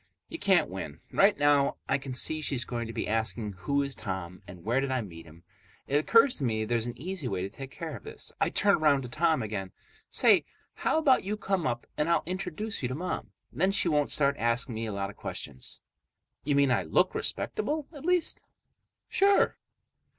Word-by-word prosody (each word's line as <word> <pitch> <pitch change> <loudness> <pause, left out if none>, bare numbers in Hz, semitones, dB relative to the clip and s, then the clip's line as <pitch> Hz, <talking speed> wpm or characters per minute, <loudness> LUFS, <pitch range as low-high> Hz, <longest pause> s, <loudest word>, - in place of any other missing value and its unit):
You 330 - -6
can't 180 -6 +4
win. 80 -5 -7
Right 205 +1 +5
now, 145 -1 +3
I - - +1
can 135 -2 -6
see 155 +4 +3
she's 135 -4 -1
going 120 -2 -4
to - - -5
begin 110 - -2
asking 110 -1 0
who 140 +10 -1
is 140 -1 -4
Tom 95 -5 -5
and 90 -1 -11
where 120 +5 +1
did 135 - -2
I 130 -1 0
meet 85 -6 -10
him. 80 +2 -16 0.4
It 140 - +1
occurs 230 - +5
to 145 - -5
me 110 -3 0
there's 115 +1 0
an 120 0 -6
easy 175 -2 -4
way 95 -5 -2
to 95 - -5
take 135 +4 -8
care 160 +1 -6
of 105 - -10
this. - - -7
I - - +3
turn 200 0 +3
around 145 -3 +3
to 125 - -7
Tom 160 +2 +2
again. 100 -3 -5 0.4
"Say, - - +5 0.3
how - - 0
about 285 -5 +4
you 210 +2 -2
come 190 -5 -1
up 120 -2 -2
and 150 +2 +1
I'll 170 - +3
introduce 185 +4 -4
you 125 - -1
to 130 - -3
Mom? 180 +5 -4 0.2
Then 190 +4 +2
she 195 -3 +3
won't 150 -2 +2
start 140 -2 +2
asking 115 +2 0
me 110 +1 -3
a - - -3
lot 100 0 -3
of - - -21
questions." 65 -3 -7 0.6
"You 145 0 +1
mean 140 -2 +4
I - - +3
look - - +2
respectable, 310 -8 -1
at 285 - -10
least?" 355 0 0 0.6
"Sure." 395 0 +3
140 Hz, 210 wpm, -29 LUFS, 110-175 Hz, 0.6 s, Right